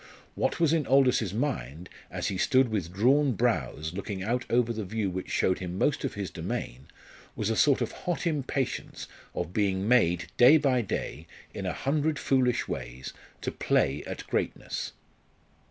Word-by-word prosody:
What - - -1
was 165 -2 +3
in 155 -4 +1
Aldous's 130 -7 +4
mind, 90 - -3 0.2
as - - -2
he 95 - -3
stood 130 +1 +4
with 95 -6 -2
drawn 130 +8 +3
brows 80 - -1
looking 100 0 -4
out 120 +5 -1
over 120 0 +2
the 110 -1 -4
view 100 0 -2
which 95 +1 -5
showed 95 - +1
him 90 -1 -5
most 145 +7 +1
of 135 - -3
his 100 -2 -4
domain, 65 +4 -5 0.5
was 110 +1 -1
a - - 0
sort 140 +2 +4
of 120 - -1
hot 175 -1 -3
impatience 140 -5 -2 0.3
of 85 - -3
being 100 -1 +1
made 90 -8 +3
day 130 +6 +8
by 135 -4 +2
day, 85 -5 -4 0.3
in - - -4
a - - -1
hundred 150 +2 0
foolish 130 -3 +1
ways, 65 +2 -6 0.3
to - - -2
play 70 +2 +1
at - - -6
greatness. - - -3
110 Hz, 170 wpm, -28 LUFS, 90-135 Hz, 0.5 s, day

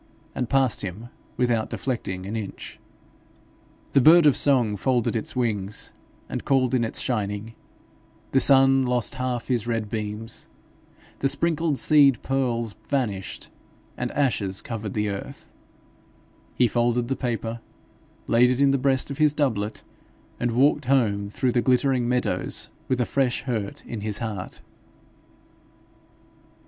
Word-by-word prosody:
and 125 -3 -3
passed 135 -4 +2
him 100 +5 -6 0.3
without 120 -3 +1
deflecting 95 -8 -4
an 105 +3 -5
inch. 105 -3 -7 1.1
The 135 - +5
bird 165 +4 +7
of 145 - +6
song 125 -7 +3
folded 120 +3 0
its 110 - -3
wings 105 -5 -2 0.4
and - - -5
called 130 -2 +2
in 125 -2 +2
its 115 - -1
shining; 105 -2 -2 0.8
the 135 - +4
sun 135 0 +5
lost 125 -3 +1
half 125 -2 -2
his 120 -3 -1
red 115 -3 -2
beams; 110 0 -4 0.7
the 135 - +2
sprinkled 165 0 0
seed 140 -4 +5
pearls 120 -5 -1
vanished, 110 -9 -3 0.5
and - - -3
ashes 105 -9 0
covered 110 -4 -6
the 105 0 0
earth; 100 -1 -7 1.0
he 125 - +4
folded 120 +1 +1
the 135 - -1
paper, 115 -2 -3 0.7
laid 120 +2 +4
it 125 0 0
in 140 -1 +4
the 140 - +1
breast 135 +1 +1
of 140 - -7
his 150 -1 +4
doublet, 110 -8 -1 0.6
and 120 - 0
walked 135 +4 +2
home 105 -6 +1
through 125 +4 0
the 120 - +2
glittering 125 -1 +2
meadows 125 0 -1 0.2
with 130 - 0
a 125 - +2
fresh 130 -2 0
hurt 110 -7 -4
in 115 -3 -6
his 105 -1 -2
heart. 105 -5 -5
120 Hz, 140 wpm, -24 LUFS, 110-135 Hz, 1.1 s, bird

